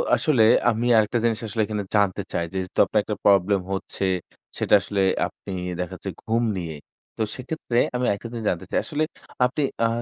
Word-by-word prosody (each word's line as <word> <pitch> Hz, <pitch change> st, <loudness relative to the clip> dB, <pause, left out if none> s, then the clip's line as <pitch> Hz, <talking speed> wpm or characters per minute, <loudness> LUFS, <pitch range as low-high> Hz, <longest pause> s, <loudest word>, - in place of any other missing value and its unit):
আসলে 130 Hz, -8 st, +3 dB, 0.3 s
আমি 115 Hz, +2 st, -2 dB
আরেকটা 110 Hz, +3 st, +2 dB
জিনিস 115 Hz, -1 st, +1 dB
আসলে 110 Hz, +1 st, -1 dB
এখানে 105 Hz, -1 st, -3 dB
জানতে 100 Hz, -1 st, +2 dB
চাই 85 Hz, -, 0 dB
যেহেতু 95 Hz, -1 st, -3 dB
আপনার -, -, +1 dB
একটা -, -, -3 dB
প্রবলেম 100 Hz, -1 st, +4 dB
হচ্ছে 95 Hz, 0 st, -4 dB, 0.5 s
সেটা -, -, 0 dB
আসলে 100 Hz, 0 st, -1 dB, 0.3 s
আপনি 100 Hz, -, -11 dB, 0.3 s
দেখা 90 Hz, -, -3 dB
যাচ্ছে -, -, -6 dB
ঘুম 115 Hz, +2 st, +1 dB
নিয়েই। 80 Hz, -4 st, -5 dB, 0.4 s
তো -, -, -3 dB
সেক্ষেত্রে 130 Hz, -2 st, -3 dB, 0.2 s
আমি 125 Hz, 0 st, 0 dB
আরেকটা 100 Hz, +3 st, -2 dB
জিনিস 115 Hz, -2 st, -5 dB
জানতে 90 Hz, +1 st, -2 dB
চাই -, -, +2 dB
আসলে 155 Hz, -1 st, -1 dB, 0.4 s
আপনি 130 Hz, +4 st, -1 dB, 0.2 s
আ -, -, +5 dB
105 Hz, 180 wpm, -24 LUFS, 95-120 Hz, 0.5 s, আ